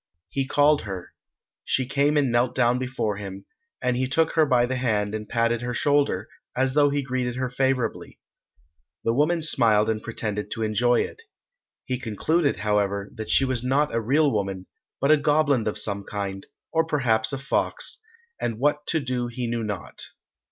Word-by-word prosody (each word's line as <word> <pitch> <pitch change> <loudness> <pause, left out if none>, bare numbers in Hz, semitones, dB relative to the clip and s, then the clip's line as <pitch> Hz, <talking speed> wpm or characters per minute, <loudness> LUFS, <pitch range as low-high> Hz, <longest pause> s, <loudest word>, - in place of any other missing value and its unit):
He 135 -1 -2
called 145 +1 +3
her. 95 -4 -7 0.5
She 130 - +1
came 145 +3 +1
and 140 -4 +2
knelt 120 +1 +1
down 125 -1 +2
before 125 -5 -2
him, 100 -1 -8 0.4
and 125 0 +1
he 130 +1 0
took 160 +4 +1
her 160 -2 +3
by 125 -2 +3
the 130 +1 -2
hand 105 -5 0
and 105 -1 -5
patted 115 0 +1
her 125 0 -3
shoulder, 145 -9 +1 0.3
as 130 +1 +1
though 145 0 +4
he 140 0 -1
greeted 125 -2 -2
her 130 0 -2
favourably. 130 -3 -1 0.8
The 115 - +1
woman 155 +5 +1
smiled 110 -7 +5
and 110 -1 -3
pretended 105 -2 -3
to 115 - -3
enjoy 120 +3 +2
it. - - -6 0.6
He 130 -1 -2
concluded, 140 +7 0
however, 100 -1 -1
that 110 -2 -7
she 135 - +4
was 130 -2 -2
not 140 +4 +1
a 115 - 0
real 140 +6 +2
woman, 95 -3 -2 0.3
but 140 +2 +3
a 155 - +7
goblin 145 -5 +2
of 105 - -2
some 100 -1 +1
kind, 100 -1 -5 0.2
or 160 0 +2
perhaps 120 -8 +1
a 135 - -2
fox, 140 +3 -1 0.4
and 115 -2 -2
what 150 +3 0
to 160 - +1
do 125 -2 -2
he 120 +1 -4
knew 115 -1 -2
not. 105 -3 -5
125 Hz, 180 wpm, -24 LUFS, 110-140 Hz, 0.8 s, a